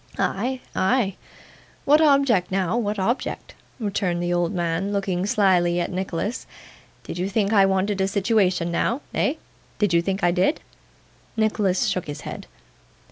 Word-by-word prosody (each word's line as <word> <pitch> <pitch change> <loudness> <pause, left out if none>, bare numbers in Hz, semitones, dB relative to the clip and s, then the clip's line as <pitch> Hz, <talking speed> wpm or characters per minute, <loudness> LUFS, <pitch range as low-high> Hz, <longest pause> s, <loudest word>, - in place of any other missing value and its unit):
'Ay, 250 +6 -1 0.2
ay? 200 -1 +1 0.7
what 300 +2 +5
object 275 - +3
now 190 +1 0
what 215 -3 -1
object?' 225 +7 -2 0.3
returned 195 -5 -1
the 175 0 0
old 175 -1 +1
man, 175 +1 -1
looking 195 -2 -1
slyly 180 -4 +3
at 175 - -2
Nicholas. 190 +4 -3 0.6
'Did 170 - -6
you 185 +2 -1
think 205 0 0
I 195 -2 +6
wanted 195 +1 0
a 190 - +2
situation 195 -4 +1
now 235 +10 0
eh? 280 - +1 0.4
Did 205 -4 +1
you 170 - +4
think 195 +2 -3
I 175 - +4
did?' 185 - +1 0.8
Nicholas 215 -2 +1
shook 185 -6 -1
his 145 - -6
head. - - -8
195 Hz, 150 wpm, -23 LUFS, 180-215 Hz, 0.8 s, I